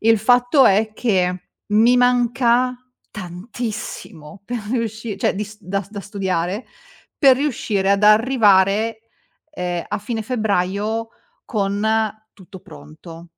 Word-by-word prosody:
Il 225 0 +4
fatto 245 +5 +4
è 215 +2 +2
che 185 -6 0 0.2
mi 225 +4 +4
manca 245 0 +2 0.3
tantissimo 200 -3 -7
per 240 +3 -4
riusci 225 -3 -3
cioè, - - 0
dis 210 +1 -6
da 195 +1 -3
da 205 -1 -6
studiare, 190 +1 -3 0.5
per 270 -3 +6
riuscire 220 -8 -1
ad 200 +1 0
arrivare, 215 -1 +4 0.5
ehm, 180 - -4
a - - -2
fine 220 +2 -4
febbraio 215 -1 -1 0.4
con 200 -3 -2 0.5
tutto 190 0 -13
pronto. 165 - -13
210 Hz, 110 wpm, -20 LUFS, 190-235 Hz, 0.5 s, per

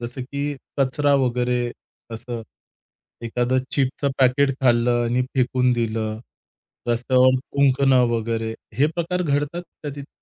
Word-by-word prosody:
जसं 120 +2 -6
की 140 +3 -3 0.2
कचरा 140 +2 +2
वगैरे 125 -2 +1 0.4
असं, 115 0 -6 0.8
एखादं 120 +2 0
चिप्सचं 140 +1 0
पॅकेट 135 +2 +4
खाल्लं 120 -1 +3
आणि 120 +2 +1
फेकून 125 -1 +2
दिलं, 110 -2 -2 0.7
रस्त्यावर 130 +2 +3
थुंकणं 135 -1 +3
वगैरे. 115 -1 -1 0.2
हे 140 +5 +3
प्रकार 180 +1 -1
घडतात 145 +2 -1 0.2
का 150 - -4
तिथे? 140 -1 -8
125 Hz, 120 wpm, -22 LUFS, 120-140 Hz, 0.8 s, पॅकेट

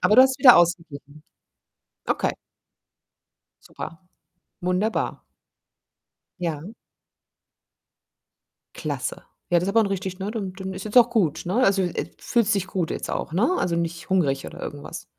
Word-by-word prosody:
Aber 210 - +4
du 255 - +11
hast 265 0 +2
wieder 250 -4 +9
ausgeglichen. 155 -4 0 0.8
Okay. - - 0 1.3
Super. 165 - -8 0.6
Wunderbar. 185 +5 -1 1.2
Ja. 170 +3 -4 2.0
Klasse. - - -4 0.3
Ja, 175 - +5
das 175 - -1
ist - - -2
aber 225 +3 +4
'n - - 0
richtig 190 -1 -4
ne, 195 +2 -3
dann 205 -4 -4
dann 190 0 -6
ist 190 0 -7
jetzt 215 +3 -6
auch 240 0 +7
gut, 170 - +1
ne? 185 - -1
Also, 195 -1 +3
äh, 175 - -2
fühlst 225 -3 +1
dich 195 -2 -1
gut 185 -3 -2
jetzt - - -4
auch, - - -3
ne? 220 - +2
Also 170 -1 0
nicht 165 -1 -3
hungrig 140 -8 +1
oder - - -9
irgendwas. 145 -1 -7
185 Hz, 145 wpm, -24 LUFS, 170-210 Hz, 2.0 s, du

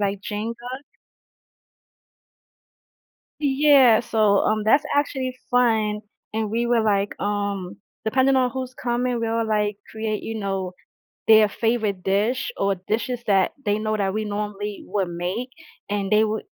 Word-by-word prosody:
like, 200 -1 -1
Jenga. 235 +5 -5 2.6
Yeah, 275 -5 +5
so, 215 -4 +2
um, 215 +1 +1
that's 275 +7 +4
actually 265 -3 -1
fun, 220 -4 +2 0.3
and 220 -1 -2
we 235 +2 0
were 235 -1 +3
like, 205 -2 +1
um, 200 -2 -2 0.3
depending 260 +4 +3
on 255 -1 +2
who's 255 0 -5
coming, 245 0 -1
we'll 230 0 0
like 210 -1 0
create, 220 -1 -3
you 225 - -5
know, 195 -3 -3 0.6
their 220 -1 +7
favorite 215 -3 -1
dish 210 +8 0
or 195 0 +1
dishes 240 +2 -2
that 195 -3 +3
they 205 -1 +1
know 215 0 -1
that 195 -2 0
we 215 +1 -2
normally 205 0 -4
would 195 -3 -1
make, 180 +9 -4 0.4
and 200 -1 -2
they 215 +1 +5
would 220 0 -2
215 Hz, 140 wpm, -23 LUFS, 205-240 Hz, 2.6 s, their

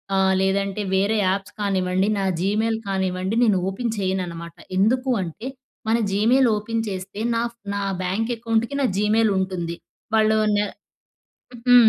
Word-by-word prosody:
ఆహ్, 190 0 +4
లేదంటే 195 +1 0
వేరే 200 +3 +2
యాప్స్ 195 +1 -1
కానివ్వండి 190 -1 +1
నా - - 0 0.2
జీమెయిల్ 215 +4 +1
కానివ్వండి, 190 +1 -1
నేను 210 -5 +4
ఓపెన్ 230 +4 -2
చేయననమాట. 175 -4 -3 0.2
ఎందుకు 255 +7 +2
అంటే, 180 +7 -6 0.4
మన 225 - +4
జీమెయిల్ 235 +6 +4
ఓపెన్ 225 +2 -2
చేస్తే 190 +1 -6 0.2
నా 230 - +1
ఫ్ 235 - -31 0.2
నా 200 - -1 0.2
బ్యాంక్ 215 +6 -1
అకౌంట్‌కి, 230 +2 0
నా 265 - +3
జీమెయిల్ 215 +2 +3
ఉంటుంది. 180 -3 -2 0.4
వాళ్ళు 220 0 +4 0.2
నె 205 0 +2 1.0
హ్మ్. 245 -2 +8
200 Hz, 140 wpm, -23 LUFS, 190-225 Hz, 1.0 s, హ్మ్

